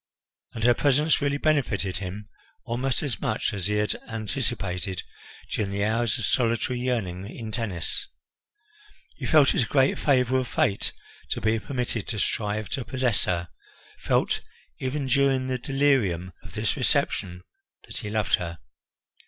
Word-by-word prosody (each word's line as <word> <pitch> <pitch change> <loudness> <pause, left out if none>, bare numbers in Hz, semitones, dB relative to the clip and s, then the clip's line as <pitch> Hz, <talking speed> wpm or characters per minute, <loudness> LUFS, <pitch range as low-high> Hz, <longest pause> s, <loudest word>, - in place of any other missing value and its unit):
And 115 - -5
her 120 +1 +6
presence 145 +5 +3
really 145 0 +1
benefited 125 -12 +1
him 100 +2 -6 0.4
almost 125 +3 -1
as 125 -9 -2
much 110 - 0
as 100 -2 -1
he 105 - 0
had 105 0 +1 0.2
anticipated 95 -4 -2 0.5
during 105 -3 0
the 100 +1 -1
hours 115 +2 +1
of 115 - -1
solitary 120 +1 +1
yearning 100 -7 -2
in 115 -3 -6
Tennis; 105 -7 -1 1.1
he - - -4
felt 150 -4 +6
it - - +2
a 115 - 0
great 135 -1 +3
favour 130 -2 +3
of 130 - -2
Fate 100 -3 +1 0.4
to - - -1
be 110 0 +2
permitted 120 -3 -3
to 115 - -2
strive 105 0 0
to 130 - -2
possess 125 -1 0
her, 85 -2 -1 0.5
felt - - +1 0.4
even 135 +2 -2
during 135 0 +3
the 130 -1 -1
delirium 120 -11 +1
of - - -12
this - - 0
reception 90 0 0 0.4
that - - -7
he 105 - -4
loved 105 -2 -1
her. 85 -2 -5
115 Hz, 155 wpm, -26 LUFS, 100-130 Hz, 1.1 s, her